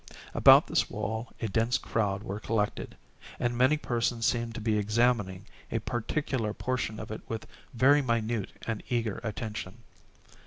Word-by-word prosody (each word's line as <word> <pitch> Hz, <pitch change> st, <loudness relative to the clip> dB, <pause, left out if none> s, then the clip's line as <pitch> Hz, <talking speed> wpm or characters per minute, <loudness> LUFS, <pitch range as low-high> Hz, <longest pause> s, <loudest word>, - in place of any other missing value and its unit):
About -, -, +8 dB
this -, -, +1 dB
wall 110 Hz, +2 st, -4 dB
a -, -, +1 dB
dense 115 Hz, +5 st, +1 dB
crowd 100 Hz, -2 st, -1 dB
were 100 Hz, -2 st, -4 dB
collected, 105 Hz, -1 st, -2 dB, 0.4 s
and 120 Hz, 0 st, 0 dB
many 130 Hz, +5 st, +4 dB
persons 120 Hz, -3 st, -1 dB
seemed 115 Hz, -2 st, 0 dB
to -, -, -4 dB
be 110 Hz, -1 st, +1 dB
examining 105 Hz, -3 st, +1 dB, 0.3 s
a 115 Hz, -, +1 dB
particular 120 Hz, 0 st, -2 dB
portion 125 Hz, -4 st, -2 dB
of -, -, -7 dB
it 110 Hz, -, -5 dB
with 115 Hz, -1 st, -4 dB, 0.3 s
very 140 Hz, +5 st, +5 dB
minute 115 Hz, -4 st, -1 dB
and 110 Hz, -2 st, -2 dB
eager 115 Hz, -4 st, -1 dB
attention. 110 Hz, -1 st, -5 dB
115 Hz, 150 wpm, -29 LUFS, 105-120 Hz, 0.4 s, About